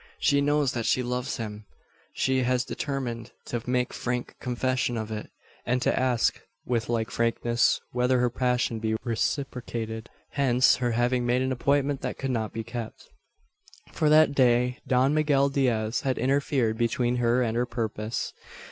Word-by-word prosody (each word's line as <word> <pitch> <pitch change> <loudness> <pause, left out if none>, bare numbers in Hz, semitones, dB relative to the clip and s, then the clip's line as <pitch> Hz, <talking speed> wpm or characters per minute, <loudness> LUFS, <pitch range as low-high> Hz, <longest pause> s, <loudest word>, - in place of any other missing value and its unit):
She 140 - +3
knows 145 -1 +2
that 115 -2 -2
she 130 - +2
loves 125 +2 -2
him. 105 -2 -6 0.5
She 130 0 +1
has 125 0 +1
determined 125 -6 -4
to 120 - -3
make 125 -1 0
frank 125 0 -3
confession 125 -1 -1
of 110 -1 -4
it; 105 -1 -5 0.3
and 125 +1 +1
to - - +2
ask 125 -3 +1 0.2
with 120 -2 -1
like 115 -2 -1
frankness 120 0 +1
whether 125 +1 +2
her 125 -1 +2
passion 125 -2 0
be 110 0 0
reciprocated. 115 -2 -3 0.2
Hence 130 -3 +4
her 120 -2 0
having 120 +1 +1
made 120 +1 +1
an 130 - -1
appointment 140 +2 +1
that - - -4
could 135 -1 -2
not 110 -3 -1
be 115 - -4
kept. 115 0 -7 0.8
For 155 - +1
that 155 -1 +6
day 125 -2 +3
Don 130 +2 +3
Miguel 145 -2 +3
Diaz 120 -5 0
had 130 -2 -1
interfered 130 -3 +1
between 120 +1 +1
her 120 +1 +2
and 115 -1 -1
her 120 +1 +1
purpose. 110 -2 -3
125 Hz, 160 wpm, -27 LUFS, 115-130 Hz, 0.8 s, that